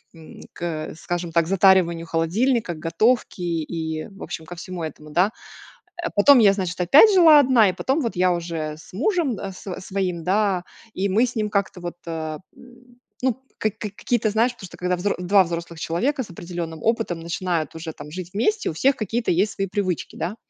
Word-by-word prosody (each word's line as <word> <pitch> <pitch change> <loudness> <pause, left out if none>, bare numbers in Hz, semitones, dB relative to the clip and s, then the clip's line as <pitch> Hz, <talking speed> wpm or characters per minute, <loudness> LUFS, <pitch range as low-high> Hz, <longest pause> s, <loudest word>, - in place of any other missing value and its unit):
м, 160 -1 -13
к, 165 -3 -4
скажем 175 0 -4
так, 165 0 +2
затариванию 185 -3 +4
холодильника, 185 +6 +1
к - - -12
готовке, 190 +7 +1
и, 160 -1 -3
в 195 -1 -16
общем, 160 - -6
ко 175 +2 -9
всему 175 0 -6
этому, 155 -1 -7
да. 180 +7 +3 0.7
Э, 345 - -1
потом 255 +7 +7
я, 205 -3 +6
значит, 185 -2 -3
опять 300 - +7
жила 320 -5 +8
одна 250 -6 +5
и - - -6
потом 265 - 0
вот 230 -6 -3
я 180 0 +3
уже 165 -3 -3
с - - -16
мужем 305 - 0
да 195 0 -6
с 185 0 -7
своим, 185 -3 -3
да. 195 -1 +1 0.3
И 195 +2 0
мы 225 +6 +3
с 240 - -8
ним 215 -1 -1
как-то 200 -3 -1
вот, 175 0 -5
э, 160 -2 -4 0.2
м, 245 0 -18 0.2
ну, 260 0 0 0.2
ка 215 - +1
ка 210 +1 -6
какие-то, 220 +2 -1
знаешь, 230 +4 +2
потому 195 - -10
что, - - -13
когда 180 0 0
взро 200 +3 -1
два 190 +2 +4
взрослых 170 -1 -6
человека 255 - 0
с 210 - -11
определенным 170 -2 -6
опытом 225 -7 0
начинают 170 -1 -2
уже 160 0 -6
там 150 0 -11
жить 180 0 -6
вместе, 420 - +1
у - - -7
всех 270 - +3
какие-то 225 +2 -1
есть 195 +5 +1
свои 195 - -1
привычки, 185 -3 -2
да. 205 +6 -3
185 Hz, 200 wpm, -23 LUFS, 170-220 Hz, 0.7 s, жила